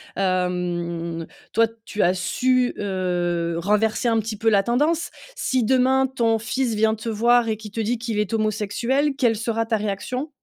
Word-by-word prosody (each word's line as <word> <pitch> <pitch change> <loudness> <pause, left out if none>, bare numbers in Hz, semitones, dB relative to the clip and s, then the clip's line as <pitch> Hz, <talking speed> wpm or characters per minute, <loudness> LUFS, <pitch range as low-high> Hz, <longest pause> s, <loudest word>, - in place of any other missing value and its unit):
Hem, 175 -3 -1 0.3
toi, 230 - +5 0.2
tu 210 -1 -3
as 175 - +4
su, 250 +7 +1
heu, 175 -3 -1
renverser 210 +6 +1
un 225 -1 +3
petit 220 0 -4
peu 225 +2 +2
la 205 -2 +4
tendance. 300 +9 +1 0.3
Si, 260 -2 0
demain, 260 +3 +3
ton 230 -4 +1
fils 235 +1 -1
vient 220 +1 +3
te 220 +1 -5
voir 235 +2 +3
et 220 - -1
qu'il 215 -1 -10
te 225 - -5
dit 230 +3 0
qu'il 225 -2 -3
est 210 0 -1
homosexuel, 225 +7 0
quelle 240 -5 +3
sera 225 +1 -1
ta 225 -1 0
réaction? 215 +8 -3
220 Hz, 175 wpm, -23 LUFS, 195-240 Hz, 0.3 s, toi